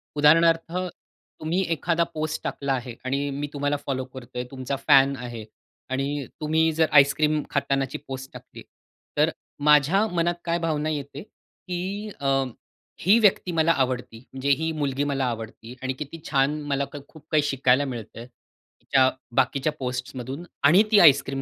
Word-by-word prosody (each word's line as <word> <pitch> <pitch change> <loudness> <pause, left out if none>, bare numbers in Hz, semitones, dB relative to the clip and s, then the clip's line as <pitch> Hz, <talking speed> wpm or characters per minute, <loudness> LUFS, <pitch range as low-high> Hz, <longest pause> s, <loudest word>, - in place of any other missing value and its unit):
उदाहरणार्थ 165 +2 +4
तुम्ही 180 -1 -5
एखादा 170 +2 +1
पोस्ट, 155 0 -3
टाकला 140 -1 -2
आहे 125 -2 -4
आणि 140 +2 -1
मी 145 - -2
तुम्हाला 145 0 0
फॉलो 130 -2 -2
करतोय 125 -1 -6
तुमचा 130 +1 -4
फॅन 135 -1 +6
आहे 120 -2 -7 0.5
आणि 135 +1 -2 0.2
तुम्ही 160 +1 +2
जर 160 0 +3
आईसक्रीम 150 +2 +2
खातानाची 135 -2 -1
पोस्ट 130 0 -7
टाकली, - - -12 0.6
तर - - +4 0.4
माझ्या 150 +9 +5
मनात 175 -2 0
काय 170 0 0
भावना 155 -2 -1
येते 145 +2 -5
की 195 +1 -7
अ, 135 -1 +2 0.6
ही 200 +6 +5
व्यक्ती 190 -4 +3
मला 165 0 +3
आवडती 125 -5 -1
म्हणजे 135 +1 -3
ही 160 0 -1
मुलगी 145 -3 -1
मला 135 -1 0
आवडती 115 0 -6
आणि 130 0 -1
किती 150 +3 -7
छान 140 +3 +1
मला 140 0 +1 0.2
खूप 155 -2 -16
काही 150 -2 +3
शिकायला 135 0 +2
मिळतं. 120 -2 -7
तिच्या 130 +1 -1 0.3
बाकीच्या 135 +3 +1
पोस्टमधून 125 +3 -5 0.2
आणि 175 +9 +7
ती 205 - +7
आईसक्रीम 140 -4 +5
140 Hz, 145 wpm, -25 LUFS, 130-160 Hz, 0.6 s, आणि